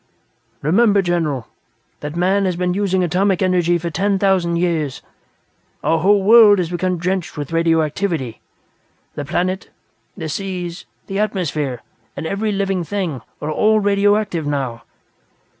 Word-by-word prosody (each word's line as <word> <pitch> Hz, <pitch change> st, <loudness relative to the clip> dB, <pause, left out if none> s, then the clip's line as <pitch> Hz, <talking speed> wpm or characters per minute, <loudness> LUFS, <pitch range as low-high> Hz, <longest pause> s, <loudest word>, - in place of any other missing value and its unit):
"Remember, 200 Hz, +5 st, +3 dB
General, 160 Hz, -9 st, -1 dB, 0.5 s
that 150 Hz, +1 st, -6 dB
man 190 Hz, +3 st, +2 dB
has 185 Hz, -2 st, 0 dB
been 180 Hz, 0 st, 0 dB
using 190 Hz, -1 st, +1 dB
atomic 185 Hz, +2 st, +1 dB
energy 175 Hz, -2 st, +2 dB
for 170 Hz, 0 st, -4 dB
ten 195 Hz, +5 st, +1 dB
thousand 185 Hz, -3 st, +2 dB
years. 165 Hz, -6 st, -1 dB, 0.8 s
Our 165 Hz, -, +2 dB
whole 200 Hz, +3 st, +3 dB
world 215 Hz, -1 st, +7 dB
has 175 Hz, -2 st, -2 dB
become 180 Hz, +1 st, -1 dB
drenched 180 Hz, 0 st, -2 dB
with 145 Hz, 0 st, -5 dB
radioactivity. 165 Hz, -, 0 dB, 0.7 s
The 145 Hz, -, -5 dB
planet, 185 Hz, +6 st, -2 dB, 0.5 s
the 160 Hz, -4 st, -4 dB
seas, 180 Hz, +1 st, -4 dB, 0.2 s
the 195 Hz, +1 st, -3 dB
atmosphere, 155 Hz, -, -2 dB, 0.3 s
and -, -, -4 dB
every 205 Hz, +5 st, -1 dB
living 195 Hz, -2 st, -1 dB
thing, 170 Hz, -, -3 dB, 0.2 s
are 150 Hz, -, -2 dB
all 215 Hz, +6 st, +3 dB
radioactive, 205 Hz, -4 st, +1 dB
now. 135 Hz, -5 st, -2 dB
180 Hz, 135 wpm, -19 LUFS, 160-195 Hz, 0.8 s, world